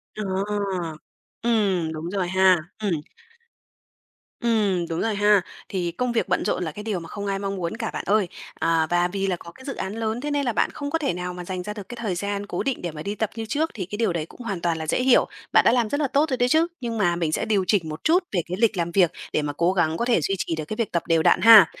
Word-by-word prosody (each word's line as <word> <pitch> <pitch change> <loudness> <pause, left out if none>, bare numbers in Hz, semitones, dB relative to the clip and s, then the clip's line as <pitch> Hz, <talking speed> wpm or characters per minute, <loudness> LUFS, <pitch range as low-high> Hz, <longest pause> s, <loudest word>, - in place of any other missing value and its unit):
Ờ, 215 - -3 1.2
ừm, 200 -8 +1
đúng 160 +2 -5
rồi 190 -1 -1
ha, 190 0 +5 0.2
ừm. 210 -3 -1 1.5
Ừm, 205 -7 +1
đúng 165 0 -2
rồi 225 -2 0
ha, 205 -1 +4 0.3
thì 180 -3 -2
công 250 +8 -1
việc 235 - 0
bận - - 0
rộn 180 - 0
là 160 - -3
cái 210 - -8
điều 210 -4 -2
mà 165 -1 -10
không 205 -1 -5
ai 195 -1 -1
mong 200 0 -3
muốn 170 -3 -3
cả - - -2
bạn - - -4
ơi, 205 -2 +3 0.3
ờ, 165 -1 +2
và 175 0 +3
vì 195 +1 -2
là 185 - +1
có 170 0 -11
cái 260 +8 -15
dự 275 - -4
án 190 +2 -4
lớn, 225 +1 -2
thế 295 +1 -3
nên 285 -1 0
là 240 - 0
bạn - - +2
không 285 - -4
có 325 - +1
thể 285 - 0
nào 180 +1 -4
mà 180 0 -7
dành 185 0 -4
ra 210 - -5
được 205 -3 -9
cái 245 - -6
thời 205 -6 -1
gian 200 +2 -3
cố - - -3
định 270 -2 -2
để 175 - -3
mà 150 -1 -8
đi 200 +1 -3
tập 215 0 -1
như 225 -1 -4
trước, 300 +8 -1
thì 190 -5 -4
cái 205 +4 -6
điều 220 -5 +1
đấy 160 -2 -2
cũng 205 - -14
hoàn 200 -7 -4
toàn 170 -1 0
là 160 -1 -5
dễ 205 - +1
hiểu. 255 -1 +5 0.3
Bạn - - +6
đã - - +6
làm 240 -3 +2
rất 285 - -1
là 295 - +1
tốt 290 +4 +2
rồi 260 - 0
đấy 245 0 +2
chứ, 320 +4 +4
nhưng 230 -2 -3
mà 175 -5 +2
mình 165 -2 -1
sẽ - - 0
điều 210 -4 +2
chỉnh 180 -7 +2
một 155 +1 -7
chút 350 +4 +4
về 190 - +1
cái 180 +1 -3
lịch 220 -3 +3
làm 170 0 -1
việc 175 -2 +4 0.2
để - - +2
mà 145 -1 -3
cố 170 +2 +2
gắng 165 -3 +1
có 235 - 0
thể 240 -8 +3
duy 195 +6 0
trì 170 - -2
được 155 -1 -4
cái 215 - -5
việc 230 -3 -1
tập 170 - 0
đều 165 -1 +3
đặn - - +4
ha. 220 -2 +10
200 Hz, 290 wpm, -24 LUFS, 175-230 Hz, 1.5 s, ha